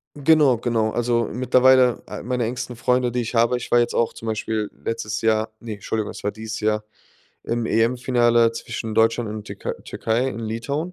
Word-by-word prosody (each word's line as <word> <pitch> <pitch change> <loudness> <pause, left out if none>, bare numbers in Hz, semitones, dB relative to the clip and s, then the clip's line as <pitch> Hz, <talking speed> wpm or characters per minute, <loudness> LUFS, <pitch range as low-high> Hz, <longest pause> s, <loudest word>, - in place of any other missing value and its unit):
Genau, 145 -4 +4
genau. 115 -2 0
Also, 120 0 +1
mittlerweile 130 0 +4
ah, - - -7
meine 125 0 -1
engsten 125 +1 -4
Freunde, 125 +1 +1
die 125 +1 -1
ich 115 +1 -5
habe 120 +2 +3
ich 125 0 -7
war 120 - +6
jetzt 120 - +1
auch 115 - +1
zum 115 - -9
Beispiel 110 -1 -2
letztes 110 -2 -3
Jahr 110 0 +1
ne, 115 -2 -6
Entschuldigung, 105 +1 -3
es - - -10
war 105 - 0
dieses 110 0 -6
Jahr, 105 0 0 0.6
im 115 -1 -1
EM-Finale 120 0 +3
zwischen 115 -1 -5
Deutschland 115 +1 +2
und 105 0 -6
Türkei 100 -2 -5
Türkei 120 +4 -1
in 115 - -5
Litauen. 115 +10 -3
115 Hz, 185 wpm, -22 LUFS, 110-125 Hz, 0.6 s, war